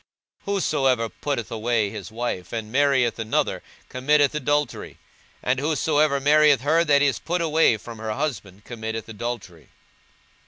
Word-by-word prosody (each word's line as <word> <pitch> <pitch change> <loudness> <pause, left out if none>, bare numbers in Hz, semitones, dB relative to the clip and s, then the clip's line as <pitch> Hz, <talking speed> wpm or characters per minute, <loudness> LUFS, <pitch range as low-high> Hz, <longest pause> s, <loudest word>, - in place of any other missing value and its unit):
42:016:018 200 - 0
Whosoever 135 - +1
putteth 120 -7 -4
away 115 -2 0
his 105 0 -8
wife, 115 -5 -4
and 110 -2 -5
marrieth 130 -4 +2
another, 110 0 -1 0.3
committeth 145 +2 +2
adultery: 145 -2 -2 0.5
and 130 +1 +1
whosoever 150 -1 +1
marrieth 145 -1 +4
her 160 +5 +3
that 145 -3 +3
is 140 -5 +1
put 175 +2 -2
away 160 -7 +3
from 115 +1 -10
her 110 -1 -3
husband 105 -8 -4
committeth 110 -2 -5
adultery. 105 - -7
130 Hz, 140 wpm, -23 LUFS, 110-150 Hz, 0.5 s, marrieth